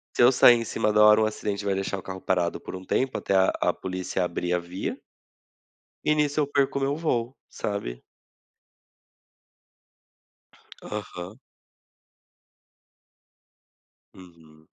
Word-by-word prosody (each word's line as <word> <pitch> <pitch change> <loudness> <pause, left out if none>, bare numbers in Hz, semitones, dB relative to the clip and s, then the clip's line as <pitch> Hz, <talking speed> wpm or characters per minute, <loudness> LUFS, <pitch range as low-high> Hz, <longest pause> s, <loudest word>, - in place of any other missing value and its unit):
se - - +4
eu 120 - +7
sair 125 -1 +7
em 115 - -2
cima 105 -1 -1
da 105 0 +5
hora, 105 0 +7
um - - +4
acidente 105 -1 -3
vai 100 -1 +1
deixar 95 0 -3
o - - -9
carro 95 0 -8
parado 90 -2 0
por - - -9
um 95 0 -8
tempo, 130 +6 0
até 100 - -1
a 95 0 +4
a - - +2
polícia 95 0 -3
abrir 90 0 -2
a 90 - +2
via 85 +2 -5 1.1
e 150 - +4
nisso 150 0 +1
eu 145 - +2
perco 140 -1 +1
o - - -2
meu 140 +1 0
voo, 130 -6 -1
sabe. - - -4 2.8
Aham. 100 -1 -7 2.8
Uhum. 80 -4 -17
100 Hz, 140 wpm, -26 LUFS, 90-120 Hz, 2.8 s, eu